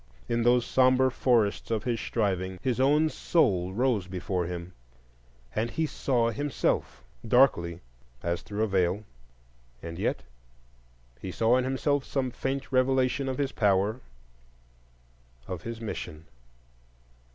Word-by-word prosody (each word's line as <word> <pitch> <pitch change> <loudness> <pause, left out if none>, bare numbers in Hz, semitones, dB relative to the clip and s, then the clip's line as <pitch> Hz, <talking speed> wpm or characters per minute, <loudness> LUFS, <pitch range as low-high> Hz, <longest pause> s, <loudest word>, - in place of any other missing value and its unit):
In 115 0 0
those 120 +1 +4
sombre 130 0 +4
forests 115 -5 +1
of 110 -2 -1
his 120 -2 -1
striving 95 -5 -1
his 125 -2 0
own 150 +4 +4
soul 100 - +1
rose 110 -3 +1
before 90 -1 -2
him, 90 +1 -6 0.8
and 115 +2 -1
he 160 +6 -1
saw 125 -5 0
himself,—darkly 110 - 0 0.4
as 85 0 -1
through 105 0 -3
a - - +1
veil; 95 +1 +1 0.8
and 85 0 -6
yet - - -1 1.0
he 95 - -6
saw 115 +5 +3
in 130 0 +1
himself 135 +2 0
some 130 -2 -2
faint 135 +2 -3
revelation 130 +1 +2
of 130 - -3
his 140 -1 -1
power, 105 +3 +1 1.5
of 90 -3 -5
his 115 +3 -6
mission. 80 -8 -6
115 Hz, 125 wpm, -28 LUFS, 95-130 Hz, 1.5 s, those